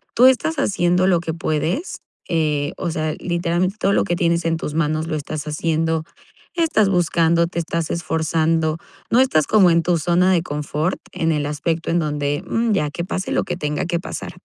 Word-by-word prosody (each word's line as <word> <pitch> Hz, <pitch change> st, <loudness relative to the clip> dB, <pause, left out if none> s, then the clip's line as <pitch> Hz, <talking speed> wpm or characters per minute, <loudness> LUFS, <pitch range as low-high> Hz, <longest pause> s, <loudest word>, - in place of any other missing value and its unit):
tú 245 Hz, -, +6 dB
estás 265 Hz, +5 st, +4 dB
haciendo 180 Hz, -7 st, +2 dB
lo 180 Hz, -3 st, +3 dB
que 165 Hz, -1 st, -4 dB
puedes, 165 Hz, -, -2 dB, 0.3 s
eh, 155 Hz, -2 st, 0 dB
o 175 Hz, -, -2 dB
sea, 155 Hz, -1 st, -2 dB
literalmente, 175 Hz, +2 st, -1 dB
todo 200 Hz, -, +2 dB
lo -, -, +3 dB
que 175 Hz, -, -1 dB
tienes 170 Hz, -1 st, +1 dB
en 165 Hz, 0 st, +1 dB
tus 150 Hz, -, -5 dB
manos 155 Hz, 0 st, 0 dB
lo 160 Hz, -, -2 dB
estás 155 Hz, 0 st, -5 dB
haciendo. 160 Hz, +1 st, 0 dB, 0.5 s
Estás 315 Hz, -, +2 dB
buscando, 170 Hz, -2 st, +2 dB
te 170 Hz, 0 st, -4 dB
estás 165 Hz, -1 st, -2 dB
esforzando, 160 Hz, -1 st, 0 dB, 0.3 s
no 235 Hz, -, +5 dB
estás 155 Hz, -, +3 dB
como 200 Hz, -4 st, +5 dB
en 165 Hz, 0 st, +3 dB
tu 170 Hz, -1 st, +1 dB
zona 175 Hz, +4 st, +3 dB
de 175 Hz, -, +2 dB
confort 150 Hz, +1 st, -2 dB
en 165 Hz, 0 st, 0 dB
el 150 Hz, -2 st, 0 dB
aspecto 160 Hz, +3 st, -2 dB
en 170 Hz, -, +2 dB
donde: 145 Hz, -2 st, -1 dB
"Mm, 230 Hz, 0 st, 0 dB
ya 150 Hz, -7 st, +1 dB
que 170 Hz, +4 st, -5 dB
pase 185 Hz, 0 st, -3 dB
lo -, -, +1 dB
que -, -, -3 dB
tenga 150 Hz, -3 st, -2 dB
que 170 Hz, -1 st, -1 dB
pasar". -, -, -6 dB
165 Hz, 195 wpm, -21 LUFS, 155-180 Hz, 0.5 s, tú